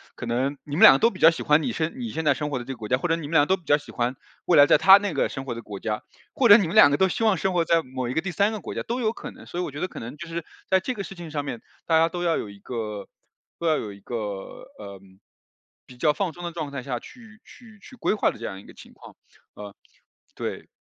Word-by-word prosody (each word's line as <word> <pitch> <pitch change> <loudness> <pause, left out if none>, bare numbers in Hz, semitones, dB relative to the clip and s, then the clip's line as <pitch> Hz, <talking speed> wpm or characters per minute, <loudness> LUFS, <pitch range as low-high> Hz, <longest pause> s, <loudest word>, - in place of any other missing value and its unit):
可 - - -7
能， 130 +5 -1
你 145 0 -5
们 - - +4
两 - - +11
个 135 - +3
都 230 - +4
比 185 - -12
较 165 - +8
喜 165 - -4
欢 150 +1 +4
你 125 -6 -2
现 160 +3 -2
你 235 -2 -4
现 160 - -4
在 145 -2 +4
生 150 +2 -4
活 140 - -2
的 120 - -5
这 135 - -7
个 130 - -7
国 110 -2 -7
家， 125 - +2
或 175 +5 -3
者 165 - +2
你 160 -3 -6
们 - - -9
两 160 - +6
个 - - -13
都 - - +1
比 180 - -23
较 145 - +4
喜 145 - -13
欢， 120 +2 -2 0.3
未 175 - +4
来 145 - +9
在 145 - +5
他 195 +5 +8
那 200 -3 -3
个 - - +1
生 135 - -6
活 135 - -4
的 115 - -7
国 100 -3 -8
家， 105 -1 -3 0.3
或 250 - +3
者 205 - +10
你 205 -5 +3
们 170 - -5
两 215 - +8
个 145 - +2
都 190 +5 +2
希 225 - -1
望 215 -3 +4
生 190 +2 -1
活 170 -2 +1
在 165 0 +2
某 130 -1 -5
一 125 - -3
个 160 - 0
第 190 - -4
三 200 +4 +1
个 215 - -5
国 - - -7
家， - - -2
都 245 +2 -3
有 220 -2 +1
可 - - -8
能。 255 - -15
所 175 - -6
以 - - 0
我 150 - -5
觉 145 - -7
得 185 - -2
可 - - -9
能， 115 +5 -8
就 170 - -8
是， 165 -1 -5 0.2
在 190 - +4
这 255 +7 -3
个 205 -5 -5
事 195 - -9
情 175 -2 -9
上 150 -1 -3
面， 120 -5 -6 0.2
大 160 -1 +3
家 165 - +4
都 175 +1 -5
要 170 -1 +1
有 105 - -5
一 100 0 -13
个 105 -3 -6 0.5
都 170 - -3
要 155 - +3
有 105 -2 -5
一 100 - -16
个， 120 +4 -5 0.6
呃， 100 -2 -10 0.9
比 130 - -15
较 150 +5 +2
放 175 +1 -2
松 175 - -11
的 175 - -4
状 155 -4 -5
态 135 -3 -5
下， 125 -3 -3
去 225 - -15
去 220 -4 -16
去 255 - -14
规 240 - 0
划 215 - +2
的 - - -7
这 115 - -7
样 95 -3 -6
一 - - -16
个 - - -14
情 - - -15
况。 - - -15 0.4
呃， 105 -1 -10 0.6
对。 - - -5
155 Hz, 345 characters per minute, -24 LUFS, 125-190 Hz, 0.9 s, 两